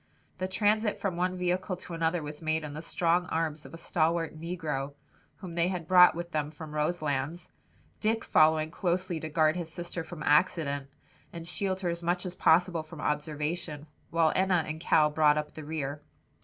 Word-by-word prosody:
The 185 - -1
transit 210 +2 +1
from 190 -4 -1
one 180 +1 0
vehicle 180 +1 -1
to 180 - -8
another 165 0 0
was 150 +1 -7
made 160 0 0
in 150 -1 -6
the 155 - -6
strong 170 +1 +1
arms 160 -2 -2
of - - -15
a - - -8
stalwart 165 0 0
negro 155 -4 -4 0.4
whom 185 -3 -9
they 170 +1 +2
had 180 -3 -3
brought 180 -2 +7
with 170 0 -5
them 150 -2 -1
from 155 0 -9
Roselands, 150 0 -2 0.5
Dick 225 +1 0
following 155 0 +4
closely 180 -1 -1
to 155 - -5
guard 155 0 +3
his 170 -2 -4
sister 175 0 -5
from 160 -1 -8
accident, 145 -3 +2 0.4
and 165 -1 -7
shield 190 +2 -1
her 180 - 0
as 170 0 -3
much 175 +2 0
as 180 - -4
possible 175 0 +3
from 155 0 -11
observation, 150 +1 -2 0.2
while 165 -1 +3
Enna 185 -3 +3
and 155 +1 -4
Cal 155 -2 +3
brought 150 -1 +4
up 150 0 -3
the 155 - -8
rear. 145 -1 -4
165 Hz, 185 wpm, -29 LUFS, 155-180 Hz, 0.5 s, brought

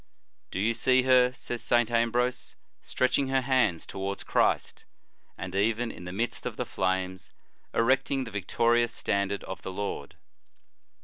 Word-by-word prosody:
"Do - - -4
you 110 +4 +2
see 130 +2 +3
her," 125 -1 +5
says 120 -2 -5
St. 120 0 +2
Ambrose, 120 +2 0 0.3
"stretching 130 +2 +1
her 135 0 +2
hands 125 -10 +1
towards 100 +1 -4
Christ, - - 0 0.5
and 95 -1 -6
even 115 +4 +1
in 90 - -10
the 90 - -5
midst 115 +6 -2
of - - -6
the - - -2
flames 95 0 -2 0.4
erecting 130 +3 +2
the 115 - -8
o - - -19
victorious 115 +4 +1
standard 100 0 -1
of 95 -3 -7
the 95 - -6
Lord? 95 -7 -5
115 Hz, 150 wpm, -28 LUFS, 95-125 Hz, 0.5 s, her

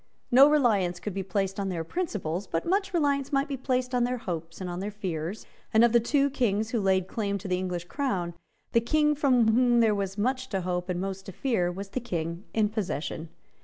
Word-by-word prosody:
No 270 +4 +8
reliance 210 -12 +2
could 210 - -5
be 195 - -2
placed 195 +1 -2
on 195 -1 -1
their 170 -3 -2
principles 195 - -3
but 165 - -2
much 390 +2 +1
reliance 285 -5 +1
might 275 +1 +1
be 280 - -3
placed 255 -1 -1
on 245 -1 +3
their 250 +1 0
hopes 165 -6 -5
and 185 - -4
on 175 0 -4
their 200 +2 -3
fears; 185 -2 -4 0.3
and 220 +1 +5
of 235 - +5
the 235 - +7
two 280 +4 +2
Kings 220 -5 0
who 230 - 0
laid 190 -1 +2
claim 200 -1 -2
to 200 +1 -7
the 180 -1 0
English 180 -2 -3
crown, 180 -8 -2 0.4
the 230 - +4
King 300 +5 +2
from 255 -6 +3
whom 240 0 +4
there 225 -2 +4
was 195 -1 -3
most 255 +4 -1
to 195 -2 -1
hope 180 0 -2
and 180 -1 -1
most 195 0 -4
to - - -5
fear 185 -6 0
was 195 +2 -7
the 255 - -2
King 170 -5 -4
in 215 -2 +2
possession. 165 -6 -3
205 Hz, 225 wpm, -27 LUFS, 180-255 Hz, 0.4 s, No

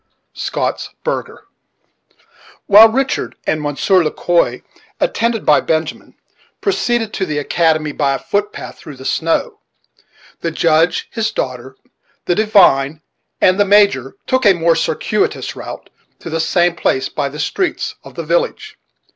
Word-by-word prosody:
Scotts - - -3
Burgher - - -4 1.2
While 215 +3 +8
Richard 265 +4 -1
and 155 - 0
Monsieur 150 +6 +2
Le 155 - 0
Quoi, 175 +2 0 0.4
attended 235 - 0
by 150 - +5
Benjamin, 160 -1 -3 0.4
proceeded 240 - 0
to 195 - -2
the 155 -5 -2
academy 155 +1 +1
by 140 -2 0
a - - -2
foot 205 +1 -2
path - - -9
through 150 - -10
the 130 0 -12
snow, 415 - -1 0.8
the 170 - -2
judge, 165 +1 +1
his 225 -2 -1
daughter, 130 0 -5 0.5
the - - +2
divine, 170 -8 +3 0.4
and 185 +2 +4
the - - +6
Major 200 -10 +3
took 260 0 +1
a 195 - +7
more 170 -1 +2
circuitous - - -1
route - - -9 0.3
to 165 - -9
the 165 - -1
same 175 +1 +2
place 130 -5 0
by 140 -2 -3
the 145 - -10
streets 350 - -2
of - - -13
the - - -4
village. - - -2
170 Hz, 145 wpm, -17 LUFS, 150-210 Hz, 1.2 s, While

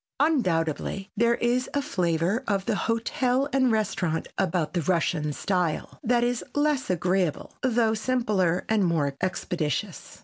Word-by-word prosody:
Undoubtedly 195 - 0
there 235 0 +3
is 245 +2 0
a 285 - +2
flavor 180 - 0
of 195 -2 0
the 230 - +1
hotel 245 +5 0
and 260 -2 +3
restaurant 180 -7 -1
about 165 -2 0
the 175 - 0
Russian 165 -2 0
style 175 +1 -2
that 240 0 +2
is 240 0 0
less 290 -2 +1
agreeable, 180 -2 0
though 235 -3 +2
simpler 215 -7 0
and 220 -2 +2
more 155 -6 +1
expeditious. 175 0 -3
200 Hz, 135 wpm, -26 LUFS, 170-240 Hz, -, there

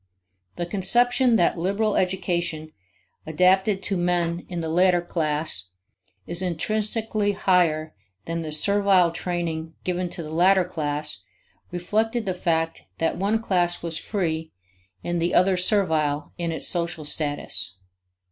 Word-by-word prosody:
The 175 - -3
conception 240 +7 +3
that 175 -3 +2
liberal 200 +4 0
education, 175 -4 -1 0.6
adapted 190 +5 +3
to 195 - 0
men 175 -1 0
in 175 -2 -4
the 165 - -3
latter 180 +2 +3
class, 155 - -1 0.6
is 170 +1 -1
intrinsically 210 +4 -1
higher 170 -5 +2 0.3
than 165 0 -3
the 155 -1 -5
servile 195 +1 +3
training 165 -2 -3
given 180 0 -2
to 170 - -6
the 155 - -8
latter 185 +2 +4
class 150 - -3 0.5
reflected 220 +6 -1
the 190 - -1
fact 165 -2 -1 0.2
that 165 - 0
one 215 +4 0
class 175 -5 +1
was 165 -2 -3
free 160 -6 -2 0.5
and 175 -1 -1
the 170 +1 0
other 185 +1 +4
servile 160 -6 +1
in 170 -2 -2
its 160 - -3
social 170 -3 -1
status. 145 - -2
175 Hz, 130 wpm, -24 LUFS, 160-190 Hz, 0.6 s, latter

